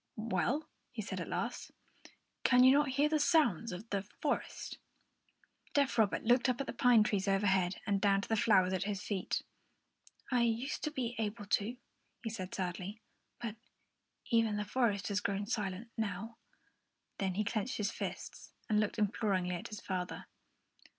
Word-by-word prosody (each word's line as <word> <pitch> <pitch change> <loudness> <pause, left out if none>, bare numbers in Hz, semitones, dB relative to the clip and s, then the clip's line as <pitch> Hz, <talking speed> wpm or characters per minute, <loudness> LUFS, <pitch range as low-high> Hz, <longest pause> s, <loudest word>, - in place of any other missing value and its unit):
"Well," 230 - 0 0.2
he - - -4
said - - -4
at - - -4
last, - - -3 0.7
"can 250 0 +6
you 260 - +9
not 290 +1 +4
hear 290 +2 +5
the 310 0 +1
sounds 290 - +3
of 180 +5 -7
the 200 -1 +1
forest?" 200 - -3 1.0
Deaf 280 -3 +3
Robert 220 -4 +2
looked 245 +3 +4
up 250 - 0
at 275 - -1
the - - -5
pine 240 -2 +5
trees 200 -2 0
overhead 195 -2 +2
and 200 -2 +1
down 195 -1 +4
to - - -6
the 225 - +2
flowers 190 -4 +4
at 185 +1 0
his 200 -2 -3
feet. 195 -3 -2 0.9
"I 250 -2 +3
used 235 +4 0
to - - 0
be 245 -5 -2
able 210 -1 -2
to," 210 +4 0 0.5
he 225 - -2
said 185 -4 -5
sadly, 185 +3 -4 0.4
"but 230 -2 -5 0.7
even 225 -2 +3
the 210 - -2
forest 205 -3 +1
has 200 -1 +1
grown 200 0 -1
silent 210 0 -3
now." 220 +2 -3 0.8
Then 190 -2 0
he 210 - +1
clenched 215 +3 -2
his 210 0 0
fists - - -6
and 210 -1 +3
looked 210 +1 0
imploringly 200 -4 +1
at 175 - -4
his 210 - -8
father. 180 -2 -4
210 Hz, 170 wpm, -34 LUFS, 195-235 Hz, 1.0 s, you